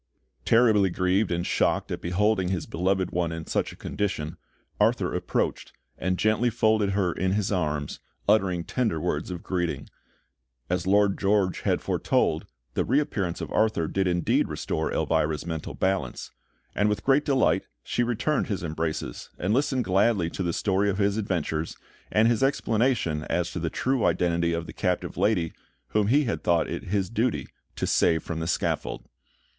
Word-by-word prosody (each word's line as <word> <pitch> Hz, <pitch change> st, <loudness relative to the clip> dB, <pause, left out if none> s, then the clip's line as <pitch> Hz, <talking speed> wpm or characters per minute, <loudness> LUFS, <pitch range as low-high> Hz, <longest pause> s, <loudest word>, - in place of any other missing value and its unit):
Terribly 110 Hz, -4 st, +4 dB
grieved 95 Hz, +3 st, +1 dB
and 85 Hz, 0 st, -1 dB
shocked -, -, +1 dB
at -, -, -3 dB
beholding 95 Hz, +2 st, +1 dB
his 90 Hz, -3 st, -2 dB
beloved 95 Hz, +1 st, 0 dB
one 85 Hz, -1 st, 0 dB
in 80 Hz, -1 st, -5 dB
such -, -, -1 dB
a -, -, -11 dB
condition, 85 Hz, -5 st, -3 dB, 0.4 s
Arthur -, -, +2 dB
approached, -, -, -2 dB, 0.2 s
and 90 Hz, 0 st, -1 dB
gently 110 Hz, +4 st, +2 dB
folded 110 Hz, -3 st, +2 dB
her 95 Hz, -3 st, +1 dB
in 95 Hz, 0 st, 0 dB
his 105 Hz, -1 st, 0 dB
arms, 75 Hz, -6 st, -1 dB, 0.3 s
uttering 95 Hz, -5 st, +3 dB
tender 110 Hz, -5 st, -1 dB
words -, -, -2 dB
of 90 Hz, -2 st, -6 dB
greeting. 90 Hz, -2 st, -2 dB, 0.8 s
As 90 Hz, 0 st, -1 dB
Lord 100 Hz, 0 st, +3 dB
George 100 Hz, -3 st, +2 dB
had -, -, +1 dB
foretold, -, -, 0 dB, 0.3 s
the -, -, +1 dB
reappearance 105 Hz, -, 0 dB
of -, -, -5 dB
Arthur 110 Hz, -7 st, +1 dB
did 95 Hz, +2 st, 0 dB
indeed 85 Hz, -2 st, +2 dB
restore 80 Hz, -, -2 dB
Elvira's 75 Hz, 0 st, 0 dB
mental 80 Hz, -2 st, -5 dB
balance; 95 Hz, -10 st, -1 dB, 0.4 s
and 105 Hz, +1 st, +2 dB
with 105 Hz, -, -1 dB
great 140 Hz, +2 st, +4 dB
delight, 135 Hz, -2 st, +2 dB, 0.2 s
she -, -, -1 dB
returned 120 Hz, +5 st, 0 dB
his 100 Hz, -5 st, -3 dB
embraces, 80 Hz, -1 st, -3 dB
and 95 Hz, +4 st, 0 dB
listened 130 Hz, 0 st, +1 dB
gladly 95 Hz, -2 st, +2 dB
to -, -, -4 dB
the 85 Hz, -2 st, 0 dB
story 100 Hz, +3 st, +1 dB
of 95 Hz, -, -1 dB
his 100 Hz, -1 st, +2 dB
adventures, 85 Hz, -6 st, -2 dB, 0.3 s
and 110 Hz, +1 st, +4 dB
his 115 Hz, -2 st, +2 dB
explanation 115 Hz, -, +1 dB
as -, -, -1 dB
to -, -, -4 dB
the -, -, -1 dB
true 130 Hz, -3 st, 0 dB
identity 85 Hz, -1 st, +1 dB
of 85 Hz, 0 st, -2 dB
the 80 Hz, -, -9 dB
captive -, -, -1 dB
lady 90 Hz, -7 st, +1 dB, 0.4 s
whom 105 Hz, -1 st, +1 dB
he 145 Hz, +7 st, +4 dB
had 115 Hz, -, -2 dB
thought 85 Hz, -2 st, +2 dB
it -, -, -5 dB
his 95 Hz, 0 st, 0 dB
duty 115 Hz, +3 st, 0 dB, 0.3 s
to -, -, -2 dB
save 80 Hz, -1 st, +2 dB
from 80 Hz, -1 st, -4 dB
the 80 Hz, -, -3 dB
scaffold. -, -, -1 dB
95 Hz, 170 wpm, -26 LUFS, 85-110 Hz, 0.8 s, Terribly